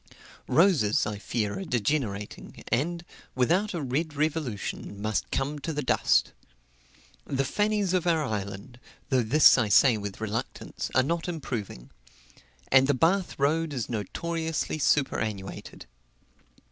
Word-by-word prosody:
Roses, 160 Hz, -, +3 dB
I 105 Hz, -1 st, -4 dB
fear, 105 Hz, -2 st, -2 dB
are -, -, -4 dB
degenerating, 110 Hz, -3 st, -3 dB
and, 170 Hz, +7 st, -1 dB, 0.3 s
without 175 Hz, +11 st, +1 dB
a 165 Hz, -, -3 dB
Red 145 Hz, +4 st, -2 dB
revolution, 145 Hz, -10 st, -3 dB
must 110 Hz, +1 st, -2 dB
come 145 Hz, +2 st, -2 dB
to 165 Hz, -, -4 dB
the 150 Hz, -1 st, -3 dB
dust. -, -, +2 dB, 0.9 s
The 135 Hz, -1 st, -1 dB
Fannies 205 Hz, +3 st, 0 dB
of 180 Hz, -1 st, +1 dB
our 165 Hz, -2 st, +2 dB
island 105 Hz, +1 st, -5 dB, 0.3 s
though 130 Hz, -2 st, +3 dB
this 135 Hz, +4 st, +6 dB
I 110 Hz, -4 st, +1 dB
say 120 Hz, +3 st, +5 dB
with 100 Hz, -2 st, -6 dB
reluctance 110 Hz, +1 st, -4 dB
are 130 Hz, -, +5 dB
not 165 Hz, +5 st, -2 dB
improving; 120 Hz, -, -5 dB, 0.8 s
and 130 Hz, 0 st, +6 dB
the 145 Hz, -, +2 dB
Bath 175 Hz, +7 st, +1 dB
road 155 Hz, +2 st, +1 dB
is 125 Hz, -6 st, -3 dB
notoriously 160 Hz, -, -3 dB
superannuated. 110 Hz, -9 st, -1 dB
135 Hz, 130 wpm, -27 LUFS, 110-160 Hz, 0.9 s, this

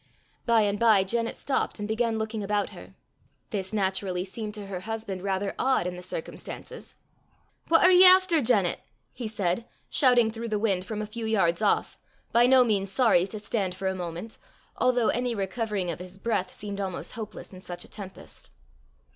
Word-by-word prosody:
By 230 Hz, -1 st, +5 dB
and 205 Hz, 0 st, 0 dB
by 220 Hz, -4 st, +5 dB
Janet 230 Hz, +4 st, -1 dB
stopped 275 Hz, -, -2 dB
and 205 Hz, -1 st, -4 dB
began 225 Hz, +1 st, 0 dB
looking 220 Hz, 0 st, -3 dB
about 205 Hz, 0 st, -1 dB
her. -, -, -13 dB, 0.6 s
This 190 Hz, -3 st, -2 dB
naturally 190 Hz, -3 st, -1 dB
seemed 210 Hz, +2 st, -5 dB
to 205 Hz, -1 st, -6 dB
her 195 Hz, -2 st, -5 dB
husband 215 Hz, -2 st, -5 dB
rather 195 Hz, 0 st, -1 dB
odd 260 Hz, -7 st, +2 dB
in 180 Hz, 0 st, -3 dB
the 180 Hz, -, -8 dB
circumstances. 185 Hz, -, -7 dB, 0.7 s
"What 330 Hz, 0 st, +5 dB
are 365 Hz, -, +7 dB
ye 365 Hz, 0 st, +8 dB
efter, 370 Hz, -3 st, +7 dB
Janet?" 205 Hz, -7 st, +2 dB, 0.3 s
he 240 Hz, -, -5 dB
said, 210 Hz, +1 st, -1 dB, 0.2 s
shouting 245 Hz, -5 st, +4 dB
through 230 Hz, +1 st, -6 dB
the 215 Hz, -, 0 dB
wind 195 Hz, -4 st, 0 dB
from 215 Hz, +1 st, -4 dB
a -, -, -3 dB
few 220 Hz, +1 st, -5 dB
yards 190 Hz, -5 st, +2 dB
off, 210 Hz, -, +1 dB, 0.3 s
by 235 Hz, +1 st, +5 dB
no 260 Hz, 0 st, +7 dB
means 200 Hz, -4 st, 0 dB
sorry 205 Hz, -6 st, +3 dB
to 215 Hz, -, -6 dB
stand 200 Hz, -3 st, -2 dB
for 190 Hz, +1 st, -3 dB
a 190 Hz, -, 0 dB
moment, 180 Hz, +4 st, -6 dB, 0.4 s
although 250 Hz, -3 st, +2 dB
any 245 Hz, -1 st, 0 dB
recovering 200 Hz, -2 st, -2 dB
of -, -, -6 dB
his 180 Hz, +1 st, -10 dB
breath 195 Hz, -4 st, -1 dB
seemed 200 Hz, -1 st, -6 dB
almost 190 Hz, -2 st, -4 dB
hopeless 220 Hz, -3 st, -8 dB
in 185 Hz, -, -11 dB
such 175 Hz, -1 st, -7 dB
a -, -, -14 dB
tempest. 195 Hz, -3 st, -9 dB
210 Hz, 185 wpm, -27 LUFS, 190-230 Hz, 0.7 s, ye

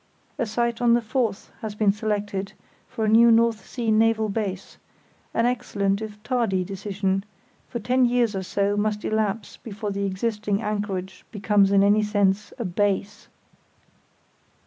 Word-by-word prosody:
A 240 Hz, -, 0 dB
site 235 Hz, +2 st, -1 dB
on 235 Hz, -1 st, +5 dB
the 240 Hz, -, +1 dB
Forth 225 Hz, -3 st, -2 dB
has 215 Hz, -2 st, -5 dB
been 210 Hz, -1 st, +3 dB
selected 205 Hz, -2 st, -3 dB, 0.3 s
for 220 Hz, -, -3 dB
a -, -, 0 dB
new 230 Hz, +2 st, +6 dB
North 230 Hz, -1 st, +3 dB
Sea 235 Hz, -3 st, -2 dB
naval 220 Hz, 0 st, +3 dB
base—an 200 Hz, +2 st, -5 dB
excellent 205 Hz, -5 st, 0 dB
if 210 Hz, -1 st, -8 dB
tardy 225 Hz, -7 st, 0 dB
decision; 195 Hz, 0 st, -2 dB, 0.5 s
for -, -, -4 dB
ten 250 Hz, +3 st, +2 dB
years 240 Hz, -3 st, +1 dB
or 190 Hz, -, -2 dB
so 200 Hz, +2 st, 0 dB
must 210 Hz, 0 st, -1 dB
elapse 215 Hz, -1 st, -1 dB
before 210 Hz, -1 st, -6 dB
the 200 Hz, 0 st, -1 dB
existing 210 Hz, +1 st, -1 dB
anchorage 205 Hz, -3 st, -4 dB
becomes 205 Hz, -1 st, +2 dB
in 200 Hz, 0 st, +5 dB
any 205 Hz, +1 st, +4 dB
sense 205 Hz, -1 st, +1 dB
a 235 Hz, -, -3 dB
"base". 200 Hz, +2 st, -1 dB
210 Hz, 145 wpm, -24 LUFS, 200-225 Hz, 0.5 s, new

